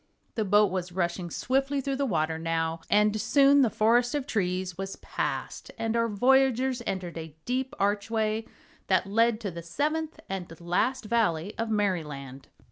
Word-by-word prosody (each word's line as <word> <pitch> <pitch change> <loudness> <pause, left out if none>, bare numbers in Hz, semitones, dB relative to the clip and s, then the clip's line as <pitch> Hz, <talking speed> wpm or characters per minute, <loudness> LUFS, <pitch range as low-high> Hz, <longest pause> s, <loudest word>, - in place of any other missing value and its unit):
The 220 - 0
boat 205 0 +4
was 180 -1 -3
rushing 175 0 -2
swiftly 270 +7 0
through 275 0 -2
the 280 0 0
water, 160 -5 0
now, 165 0 -1
and 210 +1 +3
soon 280 0 +5
the 250 - +4
forest 235 +5 +2
of 285 -3 -1
trees 185 - -1
was 195 +2 -5
passed - - -4
and 225 0 -1
our 230 0 +2
voyagers 255 +3 +3
entered 180 -3 -3
a 160 -2 -9
deep 260 +1 -2
archway 215 +2 0 0.4
that 185 -1 +3
led 225 +3 +2
to 200 -4 -3
the 170 0 -7
Seventh 300 - -2
and 180 -4 -6
last 195 +9 0
Valley 210 -5 +1
of 230 0 -1
Merryland. 150 -11 -2
210 Hz, 160 wpm, -28 LUFS, 175-245 Hz, 0.4 s, soon